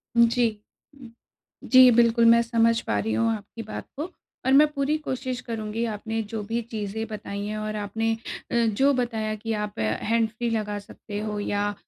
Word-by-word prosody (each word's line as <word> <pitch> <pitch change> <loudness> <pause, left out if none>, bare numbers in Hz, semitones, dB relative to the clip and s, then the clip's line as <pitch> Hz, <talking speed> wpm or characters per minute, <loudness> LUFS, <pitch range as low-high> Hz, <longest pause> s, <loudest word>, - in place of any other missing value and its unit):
जी। 235 +1 +4 1.3
जी, 255 -1 +9
बिल्कुल, 235 0 +4
मैं 235 0 +7
समझ 230 0 +2
पा - - -1
रही 225 - -1
हूँ 230 0 +2
आपकी 210 +2 -9
बात 215 - -7
को 295 - -2 0.4
और 260 - +4
मैं 290 +3 +7
पूरी 285 +1 0
कोशिश 260 -4 -4
करुँगी, 225 -1 -3
आपने 225 0 -3
जो 220 -2 -2
भी 230 +3 -2
चीज़ें 220 0 -3
बताई 205 -2 -5
हैं 215 +1 -3
और 215 0 -3
आपने 220 +2 -1 0.4
अ, - - +1
जो 265 +6 +3
बताया 225 -4 -1
कि 225 +1 -4
आप 210 -1 -6
हैंडफ्री 220 - 0
लगा 210 -2 -2
सकते 205 +1 -8
हो 210 -1 -3
या 205 0 -1
225 Hz, 170 wpm, -25 LUFS, 210-235 Hz, 1.3 s, जी